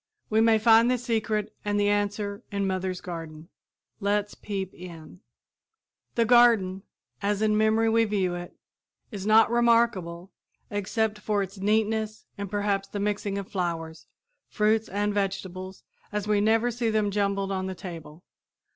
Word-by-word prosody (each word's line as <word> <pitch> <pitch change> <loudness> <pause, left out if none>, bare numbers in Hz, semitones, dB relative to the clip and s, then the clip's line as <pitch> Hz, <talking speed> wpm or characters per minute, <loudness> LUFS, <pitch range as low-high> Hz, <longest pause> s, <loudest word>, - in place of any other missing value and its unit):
We 220 +1 +4
may 225 -1 +5
find 225 +2 +5
the 250 - +2
secret 220 -3 -1
and 205 0 0
the 205 - +2
answer 205 0 -1
in 200 -1 -1
mother's 185 -1 -2
garden. 165 -2 -8 0.5
Let's 205 0 0
peep 195 -3 -5
in. 170 -1 -11 1.0
The 230 - +3
garden, 225 -6 +4 0.4
as 205 +1 0
in 215 -1 +3
memory 220 +1 +3
we 225 0 +3
view 195 -4 0
it, 175 0 -7 0.6
is 200 -2 -5
not 220 +1 +6
remarkable 230 -7 +2 0.4
except 210 +1 -1
for 205 -1 0
its 195 +1 -9
neatness 215 +1 0
and 200 -1 -5
perhaps 200 -1 -1
the 205 - -5
mixing 205 -1 -1
of 200 -1 -5
flowers, 165 -3 -3 0.4
fruits 215 +1 +1
and 205 +1 -1
vegetables 190 -2 -4 0.3
as 210 -1 -3
we 210 -1 +2
never 225 +3 +3
see 235 0 -1
them 215 -2 +1
jumbled 200 -1 0
on 190 -1 -2
the 190 - -5
table. 170 -2 -9
205 Hz, 150 wpm, -26 LUFS, 190-220 Hz, 1.0 s, not